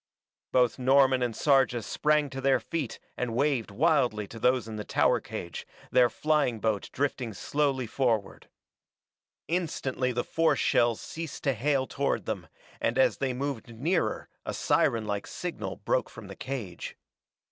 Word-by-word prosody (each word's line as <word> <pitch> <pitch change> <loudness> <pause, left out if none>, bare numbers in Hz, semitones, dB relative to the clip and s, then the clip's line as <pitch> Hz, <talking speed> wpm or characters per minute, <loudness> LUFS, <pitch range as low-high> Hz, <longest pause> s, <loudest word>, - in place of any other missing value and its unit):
Both 125 0 +3
Norman 130 0 +4
and 120 -2 -1
Sarja 135 -5 +3
sprang 150 +3 +1
to 135 -1 -5
their 135 0 +3
feet 155 -8 -4 0.2
and 120 -2 -2
waved 135 -4 +1
wildly 125 -4 +2
to 115 - -9
those 125 -1 +2
in 110 - -6
the 105 - -4
tower - - +2
cage, 85 -1 -7 0.2
their 125 -1 +5
flying 150 -7 +1
boat 110 -2 -1
drifting 130 -4 -2
slowly 140 -3 0
forward. 115 -4 -1 1.0
Instantly 140 -6 -1
the 120 0 -1
force 165 0 +2
shells 120 -2 +3
ceased 160 -3 -7
to 135 - +2
hail 135 +3 +1
toward - - -1
them, - - -4 0.3
and 115 +2 0
as 130 - +4
they 135 -1 0
moved 125 -3 -4
nearer 140 - 0 0.2
a - - -4
sirenlike 105 -3 +1
signal - - -5
broke - - 0
from - - -11
the - - -9
cage. 120 -10 -6
130 Hz, 150 wpm, -28 LUFS, 115-140 Hz, 1.0 s, their